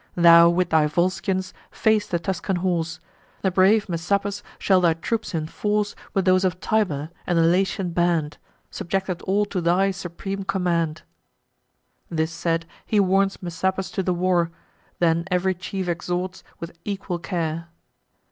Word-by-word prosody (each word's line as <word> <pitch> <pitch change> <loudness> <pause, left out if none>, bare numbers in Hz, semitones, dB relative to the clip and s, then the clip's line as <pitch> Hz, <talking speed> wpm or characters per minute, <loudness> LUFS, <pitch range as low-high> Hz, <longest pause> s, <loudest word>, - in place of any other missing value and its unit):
Thou, 170 -1 +8
with 175 0 +1
thy 155 -1 +4
Volscians, 185 +3 -1 0.2
face 220 -2 +1
the 175 - 0
Tuscan 190 +3 -2
horse; 170 -3 -1 0.4
The 190 - +2
brave 195 +4 +4
Messapus 200 +4 -1 0.2
shall 190 -2 +3
thy 170 -2 +3
troops 215 +3 -3
enforce 205 +6 -1 0.2
With 195 -2 +2
those 185 0 +4
of 180 -1 0
Tibur, 170 -10 0 0.2
and 175 - +1
the 165 - +5
Latian 185 +2 +1
band, 170 -4 0 0.3
Subjected 190 0 -2
all 205 +2 +1
to 195 -3 -3
thy 180 +4 +3
supreme 195 +1 -5
command." 170 -5 -1 1.1
This 160 -1 -1
said, 165 0 -1 0.2
he 215 - +2
warns 195 0 +2
Messapus 190 +2 -2
to 195 - -1
the 185 - 0
war, 175 -1 +1 0.5
Then 170 0 +2
ev'ry 185 +1 +1
chief 185 +1 -5
exhorts 180 +2 -3 0.2
with 170 0 -7
equal 195 -3 -3
care. 165 -2 -3
180 Hz, 145 wpm, -23 LUFS, 170-195 Hz, 1.1 s, Thou